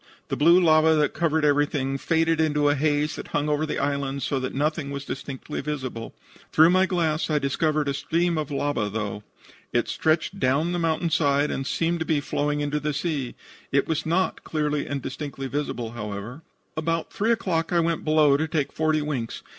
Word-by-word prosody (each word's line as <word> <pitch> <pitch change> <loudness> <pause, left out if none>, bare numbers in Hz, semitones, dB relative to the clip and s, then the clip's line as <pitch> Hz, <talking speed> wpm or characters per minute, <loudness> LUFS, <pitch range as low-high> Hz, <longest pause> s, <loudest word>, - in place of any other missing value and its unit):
The - - -1
blue 170 +4 +6
lava 160 -2 +5
that 150 -1 +2
covered 160 -2 +1
everything 145 -2 +1
faded 165 0 +2
into 150 -2 +1
the 145 - +4
haze 150 +1 0
that - - -7
hung 145 +1 -1
over 150 +1 0
the - - -2
island 140 -1 -1
so 135 - 0
that 130 0 -4
nothing 150 +1 -1
was 140 0 -5
distinctly 135 -1 -5
visible. 130 -6 -5 0.4
Through 160 +2 +6
my 185 +1 +4
glass 165 -4 0
I 155 - +2
discovered 150 +1 0
a 140 - 0
stream 170 +4 0
of 155 -2 -2
lava, 140 -6 -1
though. 105 -1 -4 0.5
It - - +1
stretched 160 0 0
down 140 +6 +2
the 175 - -1
mountain 165 0 0
side, 145 -1 +2
and 135 - -3
seemed 170 +1 0
to 160 - -2
be 155 -2 +1
flowing 145 +1 -1
into 145 +1 -1
the 150 0 -2
sea. 150 -5 -2 0.4
It 140 - +2
was 160 -1 -1
not 175 +4 0
clearly 150 -2 -1
and 140 -2 -3
distinctly 135 0 -5
visible, 130 -4 -3
however. 105 +4 -6 0.3
"About 165 +1 -2
3 220 +3 +1
o'clock 180 -8 0
I 175 - +3
went 165 -1 0
below 155 -2 +4
to 160 +2 -1
take 150 -3 -1
forty 155 -1 +1
winks. 130 -6 -4
150 Hz, 195 wpm, -25 LUFS, 140-160 Hz, 0.5 s, blue